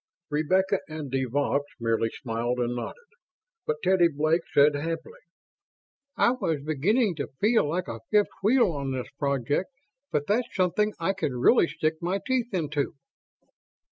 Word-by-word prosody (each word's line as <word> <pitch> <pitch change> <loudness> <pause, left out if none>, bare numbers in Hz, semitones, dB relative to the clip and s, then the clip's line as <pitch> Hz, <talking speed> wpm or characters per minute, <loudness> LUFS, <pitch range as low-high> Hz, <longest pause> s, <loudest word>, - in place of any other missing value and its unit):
Rebecca 185 +6 +2
and 155 -4 -6
de 135 0 0
Vaux 140 +2 0 0.2
merely 115 -1 +1
smiled 120 +1 -3
and 120 0 -1
nodded, 480 - -6 0.6
but 465 - +1
Teddy 185 -2 +5
Blake 155 +2 +1
said 145 +1 +5
happily, 165 - -4 1.0
"I - - +4
was 165 - -2
beginning 190 - +2
to 140 - -3
feel 220 -7 +3
like 175 +3 -2
a 115 - -5
fifth 210 -1 +3
wheel 220 -1 +4
on 140 -3 -3
this 130 -1 -5
project, 140 - 0 0.4
but 145 -1 0
that's 225 +7 +1
something 205 +3 +1
I 170 +4 +1
can 155 -9 -2
really 170 - +5
stick 155 0 -2
my 180 +3 0
teeth 255 -2 0
into." 155 -5 -1
155 Hz, 150 wpm, -27 LUFS, 140-195 Hz, 1.0 s, Teddy